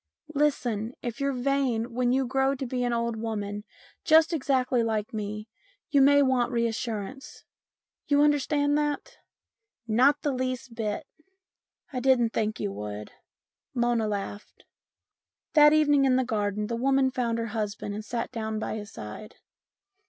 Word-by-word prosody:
" -, -, -67 dB
Listen. 245 Hz, -6 st, 0 dB
If 240 Hz, -1 st, -4 dB
you're 275 Hz, 0 st, +1 dB
vain, 250 Hz, -3 st, 0 dB
when 245 Hz, 0 st, +1 dB
you 265 Hz, +1 st, +2 dB
grow 270 Hz, +2 st, +1 dB
to 265 Hz, -, -4 dB
be 250 Hz, 0 st, -2 dB
an 245 Hz, -, 0 dB
old 235 Hz, 0 st, -1 dB
woman, 210 Hz, -2 st, -4 dB, 0.4 s
just 320 Hz, +1 st, +5 dB
exactly 260 Hz, -4 st, +1 dB
like 220 Hz, -2 st, -1 dB
me, 210 Hz, 0 st, -4 dB, 0.4 s
you 280 Hz, -, +5 dB
may 285 Hz, +1 st, +6 dB
want 260 Hz, -2 st, +2 dB
reassurance. 235 Hz, +1 st, -3 dB, 0.6 s
You 285 Hz, 0 st, +4 dB
understand 290 Hz, 0 st, +2 dB
that? 295 Hz, -, -3 dB, 0.2 s
" -, -, -63 dB
" 340 Hz, -, -54 dB
Not 260 Hz, +6 st, +3 dB
the 290 Hz, -, +1 dB
least 255 Hz, -1 st, -3 dB
bit." 225 Hz, +4 st, -3 dB, 0.4 s
" -, -, -37 dB
I 255 Hz, -, -1 dB
didn't 250 Hz, -3 st, +3 dB
think 215 Hz, -1 st, -1 dB
you 100 Hz, -, -2 dB
would." 105 Hz, +1 st, -6 dB, 0.6 s
Mona 240 Hz, -2 st, +1 dB
laughed. 205 Hz, 0 st, -6 dB, 0.9 s
That 300 Hz, -1 st, +8 dB
evening 290 Hz, -2 st, +4 dB
in 260 Hz, -1 st, +4 dB
the 260 Hz, 0 st, +2 dB
garden 210 Hz, -2 st, -1 dB
the 235 Hz, -, -3 dB
woman 265 Hz, +2 st, +2 dB
found 235 Hz, -3 st, -1 dB
her 230 Hz, -1 st, -3 dB
husband 205 Hz, -2 st, -3 dB
and 210 Hz, +1 st, -5 dB
sat 230 Hz, +2 st, -4 dB
down 220 Hz, -2 st, -3 dB
by 220 Hz, -, -3 dB
his 210 Hz, 0 st, -8 dB
side. 110 Hz, -, -9 dB
240 Hz, 160 wpm, -27 LUFS, 220-275 Hz, 0.9 s, That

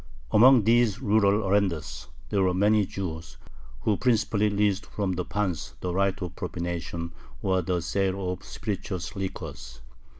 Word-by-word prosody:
Among 125 Hz, +1 st, +7 dB
these 115 Hz, -1 st, +3 dB
rural 105 Hz, -3 st, +3 dB
arendars 95 Hz, -5 st, 0 dB, 0.2 s
there 100 Hz, -, +1 dB
were 90 Hz, -1 st, +2 dB
many 105 Hz, +1 st, +3 dB
Jews, 85 Hz, -4 st, -6 dB, 0.4 s
who 105 Hz, -3 st, +1 dB
principally 110 Hz, -3 st, +2 dB
leased 100 Hz, -1 st, +1 dB
from 100 Hz, -3 st, -2 dB
the 90 Hz, 0 st, -2 dB
pans 95 Hz, -5 st, -3 dB
the 90 Hz, -1 st, -3 dB
right 100 Hz, +1 st, +1 dB
of 90 Hz, -1 st, -6 dB
"propination," 85 Hz, -1 st, -4 dB, 0.3 s
or 95 Hz, -1 st, +2 dB
the 90 Hz, 0 st, -1 dB
sale 95 Hz, 0 st, -1 dB
of 90 Hz, -, -6 dB
spirituous 95 Hz, -4 st, -5 dB
liquors. 90 Hz, -9 st, -6 dB
95 Hz, 140 wpm, -27 LUFS, 90-105 Hz, 0.4 s, Among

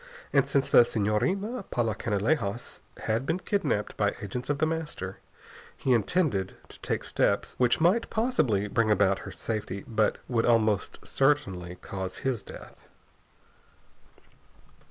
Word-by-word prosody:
And 140 Hz, -1 st, +4 dB
since 140 Hz, -1 st, +1 dB
the -, -, +7 dB
Senhorina 180 Hz, -, 0 dB
Paula 115 Hz, -3 st, 0 dB
Canalejas 110 Hz, +2 st, -1 dB, 0.2 s
had 110 Hz, +3 st, 0 dB
been 165 Hz, -, +1 dB
kidnapped 185 Hz, -, -1 dB
by 105 Hz, -1 st, +1 dB
agents 125 Hz, +6 st, -5 dB
of 145 Hz, -, +1 dB
The 155 Hz, -, +2 dB
Master, 155 Hz, -, -4 dB, 0.6 s
he 130 Hz, -, +2 dB
intended 115 Hz, -, +1 dB
to -, -, -11 dB
take -, -, -2 dB
steps -, -, 0 dB
which 125 Hz, -1 st, +3 dB
might 180 Hz, +8 st, +3 dB
possibly 155 Hz, -, +1 dB
bring 115 Hz, +1 st, +1 dB
about 100 Hz, -2 st, +3 dB
her -, -, -8 dB
safety, 105 Hz, -3 st, -4 dB
but 110 Hz, -2 st, +1 dB
would 115 Hz, -2 st, +1 dB
almost 110 Hz, -4 st, +1 dB
certainly 95 Hz, -12 st, +1 dB
cause 95 Hz, -1 st, -5 dB
his 130 Hz, -5 st, 0 dB
death. -, -, -12 dB
115 Hz, 135 wpm, -28 LUFS, 105-150 Hz, 0.6 s, the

